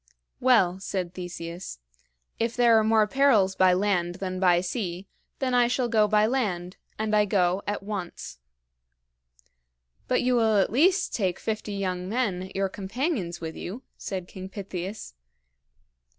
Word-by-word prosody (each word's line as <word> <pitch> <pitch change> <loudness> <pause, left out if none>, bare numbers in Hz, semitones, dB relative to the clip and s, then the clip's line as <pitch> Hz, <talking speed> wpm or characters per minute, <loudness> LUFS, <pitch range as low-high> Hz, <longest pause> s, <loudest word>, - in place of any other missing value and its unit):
"Well," 195 -8 +4
said 185 -2 -3
Theseus, 175 - -7 0.6
"if 230 0 -1
there 235 -2 +5
are - - +2
more 220 0 +4
perils 215 -6 +3
by 185 -1 +5
land 180 -2 0
than 185 -1 -4
by 180 -2 +4
sea, 185 -1 -4 0.3
then 260 -2 -1
I 245 -1 +4
shall 245 0 0
go 220 -2 +3
by 210 0 +4
land, 195 -8 -2 0.2
and 215 0 0
I 210 0 +4
go 190 -2 +1
at 205 -1 -2
once." 185 - -6 1.7
"But 250 - +1
you 250 0 +2
will 220 -3 +3
at 195 - +2
least 355 - +3
take 190 -5 0
fifty 215 -1 -4
young 185 -2 -3
men, 195 -6 -1
your 195 0 +1
companions, 195 - -3
with 160 -1 -5
you?" 225 +9 -7
said 185 -3 -5
King 190 0 -9
Pittheus. 195 - -6
200 Hz, 150 wpm, -26 LUFS, 180-225 Hz, 1.7 s, there